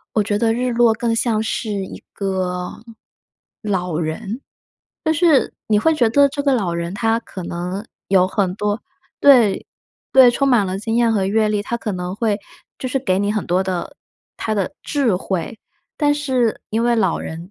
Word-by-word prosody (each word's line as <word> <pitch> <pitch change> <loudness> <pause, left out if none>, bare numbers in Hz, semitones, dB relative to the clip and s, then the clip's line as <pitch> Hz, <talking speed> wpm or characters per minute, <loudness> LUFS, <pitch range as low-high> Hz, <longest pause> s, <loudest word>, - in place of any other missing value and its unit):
我 215 - +4
觉 205 0 -1
得 225 +1 +2
日 250 +1 -1
落 235 -1 +4
更 230 0 -1
像 225 -1 +1
是 220 0 -3
一 195 -2 -5
个 185 -2 -2 0.9
老 180 -6 -1
人。 170 +9 -4 0.6
但 315 -1 +2
是 320 -3 +3
你 210 -1 +3
会 320 - +3
觉 240 -6 +3
得 280 +3 +5
这 285 +1 -4
个 275 - +3
老 195 -8 0
人 170 +2 -3
他 225 +2 +1
可 190 -5 -9
能 180 +4 -4 0.2
有 185 -1 +4
很 185 -1 -1
多 210 +1 -1 0.4
对， 245 -8 +5 0.5
对 260 -2 +8
充 275 +3 0
满 245 -6 +4
了 185 +1 -3
经 225 +2 -3
验 235 -1 +3
和 195 -3 +1
阅 215 +2 +2
历， 210 -1 0
他 235 - -3
可 230 - -4
能 180 0 -4
会， 210 -1 0 0.4
就 260 - -3
是 270 +2 0
给 190 -7 +1
你 205 +1 0
很 215 - -2
多 180 +2 +2
的 185 -2 -4 0.4
他 220 - -2
的 200 +7 -2
智 270 - +1
慧。 190 +4 -3 0.4
但 290 -1 +2
是 260 -6 0
因 225 +2 0
为 240 0 +3
老 190 -6 +1
人 165 +3 -7
215 Hz, 200 characters per minute, -20 LUFS, 190-240 Hz, 0.9 s, 对